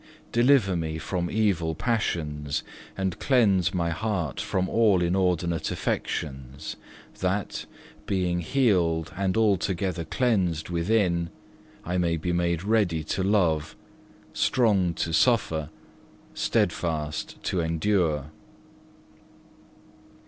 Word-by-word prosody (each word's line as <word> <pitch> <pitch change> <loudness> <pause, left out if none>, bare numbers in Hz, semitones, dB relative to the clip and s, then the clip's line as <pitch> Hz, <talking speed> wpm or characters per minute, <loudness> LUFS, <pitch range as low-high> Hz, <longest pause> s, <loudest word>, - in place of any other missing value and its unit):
Deliver 120 -5 +4
me 80 -2 -2
from 85 +2 -2
evil 95 -7 +1
passions, 75 -9 -1 0.3
and 95 -2 -2
cleanse 100 - +3
my 85 -2 -1
heart 85 - -2
from 95 0 -1
all 110 -4 +3
inordinate 85 -2 +1
affections, 70 +1 -3 0.4
that, - - -2 0.4
being 90 -2 0
healed 85 - +1
and 95 +1 0
altogether 95 -4 +1
cleansed 90 -4 0
within, 85 -1 +1 0.6
I 90 +2 -1
may 85 -1 +1
be 90 +2 -2
made 85 -1 0
ready 100 -7 +1
to 80 - -2
love, 85 -6 +1 0.6
strong 100 -9 +2
to 80 - -2
suffer, 80 - +2 0.6
steadfast 75 -3 -1
to 95 - -1
endure. 80 -3 0
85 Hz, 100 wpm, -26 LUFS, 80-100 Hz, 0.6 s, Deliver